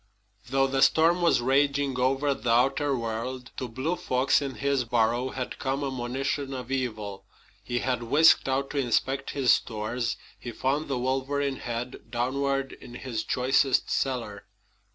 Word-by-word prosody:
Though 135 Hz, +1 st, +3 dB
the 135 Hz, 0 st, 0 dB
storm 165 Hz, +5 st, +4 dB
was 170 Hz, -7 st, +3 dB
raging 140 Hz, +1 st, +1 dB
over 135 Hz, +3 st, +2 dB
the 120 Hz, -2 st, -4 dB
outer 135 Hz, +4 st, +2 dB
world, 120 Hz, +2 st, -4 dB
to 130 Hz, -, -3 dB
Blue 130 Hz, +9 st, -2 dB
Fox 130 Hz, -3 st, +1 dB
in 135 Hz, -2 st, -4 dB
his 140 Hz, -2 st, 0 dB
burrow 120 Hz, +2 st, +1 dB
had 130 Hz, -1 st, -5 dB
come 135 Hz, +1 st, -1 dB
a 135 Hz, -, -2 dB
monition 135 Hz, +2 st, -2 dB
of 125 Hz, 0 st, -7 dB
evil. 110 Hz, -7 st, -3 dB, 0.4 s
He 120 Hz, -, -2 dB
had 125 Hz, -1 st, -1 dB
whisked 145 Hz, +4 st, +5 dB
out 135 Hz, +1 st, -1 dB
to 145 Hz, -, -1 dB
inspect 135 Hz, +2 st, 0 dB
his 135 Hz, -4 st, +3 dB
stores. 115 Hz, +2 st, -2 dB, 0.2 s
He 120 Hz, -, -6 dB
found 140 Hz, +6 st, -1 dB
the 135 Hz, -, -1 dB
wolverine 135 Hz, +2 st, -1 dB
head 120 Hz, +1 st, -6 dB
downward 135 Hz, +2 st, -1 dB
in 120 Hz, -1 st, -12 dB
his 120 Hz, -3 st, -4 dB
choicest 130 Hz, +1 st, +2 dB
cellar. 120 Hz, -6 st, -2 dB
130 Hz, 155 wpm, -27 LUFS, 120-140 Hz, 0.4 s, whisked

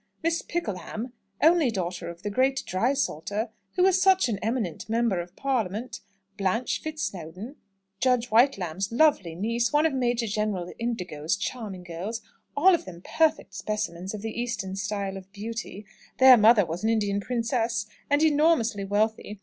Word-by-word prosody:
Miss 330 Hz, 0 st, +1 dB
Pickleham, 235 Hz, -, -4 dB, 0.3 s
only 320 Hz, -3 st, +5 dB
daughter 180 Hz, -5 st, -3 dB
of 170 Hz, 0 st, -10 dB
the 205 Hz, -, -2 dB
great 260 Hz, +4 st, +1 dB
drysalter, 215 Hz, -, -1 dB, 0.3 s
who 365 Hz, -, +4 dB
is 380 Hz, 0 st, +4 dB
such 380 Hz, -8 st, +4 dB
an 205 Hz, -4 st, -2 dB
eminent 220 Hz, -5 st, -2 dB
member 225 Hz, -4 st, +1 dB
of 175 Hz, +1 st, -11 dB
Parliament; 235 Hz, -3 st, -2 dB, 0.4 s
Blanche 205 Hz, +5 st, 0 dB
Fitzsnowdon, 210 Hz, -, -5 dB, 0.4 s
Judge 250 Hz, -1 st, +2 dB
Whitelamb's 195 Hz, -, +2 dB
lovely 235 Hz, -, +3 dB
niece; 230 Hz, +5 st, 0 dB
one 295 Hz, +2 st, +3 dB
of 320 Hz, -, +2 dB
Major 240 Hz, -2 st, 0 dB
General 210 Hz, -4 st, -2 dB
Indigo's 180 Hz, -10 st, -2 dB
charming 210 Hz, -7 st, -5 dB
girls, 180 Hz, +7 st, -5 dB, 0.4 s
all 370 Hz, +6 st, +6 dB
of 340 Hz, -, 0 dB
them 175 Hz, -1 st, -10 dB
perfect 320 Hz, -1 st, +1 dB
specimens 195 Hz, -3 st, -3 dB
of 205 Hz, -, -8 dB
the 225 Hz, +1 st, -3 dB
Eastern 220 Hz, -6 st, -3 dB
style 195 Hz, -1 st, -3 dB
of 190 Hz, 0 st, -12 dB
beauty 215 Hz, 0 st, -6 dB, 0.3 s
their 260 Hz, -1 st, +9 dB
mother 220 Hz, -2 st, +6 dB
was 170 Hz, +4 st, -5 dB
an 220 Hz, -, +2 dB
Indian 205 Hz, -3 st, +1 dB
princess, 230 Hz, -1 st, -1 dB, 0.2 s
and 290 Hz, +2 st, +3 dB
enormously 295 Hz, -9 st, +3 dB
wealthy. 210 Hz, +1 st, -1 dB
220 Hz, 150 wpm, -26 LUFS, 195-255 Hz, 0.4 s, their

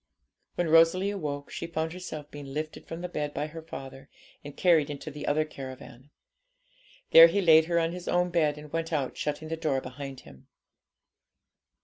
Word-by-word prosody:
When 175 Hz, -, 0 dB
Rosalie 165 Hz, +5 st, +4 dB
awoke, 145 Hz, -7 st, -5 dB
she -, -, -5 dB
found 160 Hz, 0 st, -3 dB
herself 155 Hz, -5 st, -8 dB
being 145 Hz, -1 st, -9 dB
lifted 155 Hz, +1 st, -5 dB
from 165 Hz, +1 st, -6 dB
the 180 Hz, -, -3 dB
bed 150 Hz, -4 st, -4 dB
by 145 Hz, -, -1 dB
her 160 Hz, +2 st, -8 dB
father, 135 Hz, -3 st, -10 dB, 0.3 s
and 145 Hz, -1 st, -10 dB
carried 165 Hz, -5 st, +4 dB
into 145 Hz, +1 st, -6 dB
the 150 Hz, +1 st, -7 dB
other 155 Hz, +1 st, +2 dB
caravan. 130 Hz, -2 st, -10 dB, 1.0 s
There 165 Hz, 0 st, +11 dB
he 195 Hz, +5 st, 0 dB
laid 160 Hz, -4 st, +6 dB
her 170 Hz, +1 st, 0 dB
on 165 Hz, 0 st, +1 dB
his 180 Hz, 0 st, -8 dB
own 180 Hz, 0 st, +1 dB
bed 155 Hz, -4 st, +1 dB
and 150 Hz, 0 st, -12 dB
went 165 Hz, 0 st, -2 dB
out, 140 Hz, -5 st, -1 dB
shutting 150 Hz, +1 st, -4 dB
the 165 Hz, -, -2 dB
door 155 Hz, -5 st, 0 dB
behind 135 Hz, +1 st, -8 dB
him. 65 Hz, -, -16 dB
155 Hz, 180 wpm, -28 LUFS, 145-165 Hz, 1.0 s, There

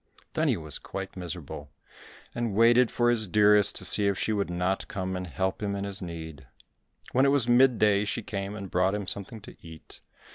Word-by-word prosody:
Then -, -, 0 dB
he -, -, +1 dB
was -, -, -4 dB
quite 95 Hz, 0 st, -7 dB
miserable, 85 Hz, -5 st, -7 dB, 0.6 s
and 120 Hz, -4 st, -3 dB
waited 120 Hz, +2 st, +5 dB
for 120 Hz, 0 st, +1 dB
his 110 Hz, -3 st, 0 dB
dearest 105 Hz, +1 st, +4 dB
to -, -, 0 dB
see 105 Hz, -, +4 dB
if 100 Hz, -1 st, 0 dB
she 110 Hz, -, -1 dB
would 100 Hz, -3 st, -1 dB
not 90 Hz, +2 st, -2 dB
come 95 Hz, -1 st, -4 dB
and 90 Hz, 0 st, -5 dB
help 95 Hz, +5 st, -3 dB
him 100 Hz, -1 st, -2 dB
in 100 Hz, -, -4 dB
his 100 Hz, 0 st, -4 dB
need. 80 Hz, -6 st, -8 dB, 0.6 s
When 130 Hz, -, +3 dB
it 140 Hz, -, +4 dB
was 140 Hz, -4 st, +2 dB
mid 125 Hz, 0 st, +4 dB
day 105 Hz, -1 st, +3 dB
she 115 Hz, +2 st, -3 dB
came 100 Hz, 0 st, -5 dB
and 100 Hz, -3 st, -8 dB
brought 95 Hz, +2 st, +1 dB
him 105 Hz, -1 st, -4 dB
something 100 Hz, +4 st, -2 dB
to -, -, -13 dB
eat. 80 Hz, -1 st, -11 dB
100 Hz, 210 wpm, -27 LUFS, 90-110 Hz, 0.6 s, waited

